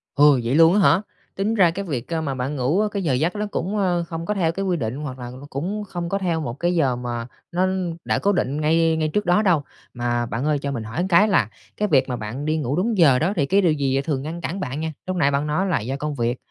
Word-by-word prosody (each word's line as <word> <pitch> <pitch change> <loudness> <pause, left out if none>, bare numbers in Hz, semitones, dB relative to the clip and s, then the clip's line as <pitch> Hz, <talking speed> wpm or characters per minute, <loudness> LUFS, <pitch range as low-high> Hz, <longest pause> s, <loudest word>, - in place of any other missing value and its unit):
Ừ, 145 -2 +6
vậy 120 +4 0
luôn 165 +2 +6
á 210 - +3
hả? 190 0 +5 0.3
Tính 205 +3 0
ra 180 -6 +4
cái 200 +3 -5
việc, 140 -2 -4
a, 160 - 0
mà 140 -4 -2
bạn 130 +3 -3
ngủ 145 +10 +1
cái 200 -2 -2
giờ 145 - +1
giấc 160 +9 0
nó 210 0 -1
cũng, 195 +5 -2
ơ, 180 -4 +1
không 165 0 -5
có 210 - 0
theo 170 -5 +1
cái 195 +3 -3
quy 180 -2 +1
định, 115 -3 -3
hoặc 140 -3 -6
là 120 0 -6 0.2
cũng 190 +10 -3
không 175 -2 -4
có 195 - 0
theo 175 -4 -1
một 130 -6 -3
cái 175 +1 +1
giờ 135 -7 +2
mà 120 -1 -4 0.2
nó 185 +2 +1 0.4
đã - - +1
cố 200 - +2
định 150 -5 -1
ngay 160 +1 +3
ngay 155 -1 0
trước 210 - 0
đó 175 +4 +4
đâu. 175 -8 +2 0.3
Mà 120 0 -1
bạn 120 +4 -3
ơi 150 -2 +1
cho 140 0 -3
mình 115 -5 -4
hỏi 115 +12 -2
cái 195 +5 +5
là 200 - +2 0.3
cái 210 - +1
việc 135 -5 +3
mà 125 - -1
bạn 120 +7 -5
đi 155 +1 +1
ngủ 140 -2 -1
đúng 210 +5 0
giờ 140 -8 +5
đó 175 +6 +1
thì 145 -6 +1
cái 195 +8 +3
điều 175 -4 +3
gì 135 -2 0
thường 140 -2 -2
ngăn 165 +4 -6
cản 185 +3 -4
bạn 140 -3 -4
nha? 160 0 -2 0.2
Lúc 185 - -1
nãy 145 -5 +3
bạn 140 +2 0
nói 175 +6 0
là 170 -7 +1
do 125 +5 -3
công 150 0 -3
việc, 120 0 -1
160 Hz, 285 wpm, -22 LUFS, 135-180 Hz, 0.4 s, Ừ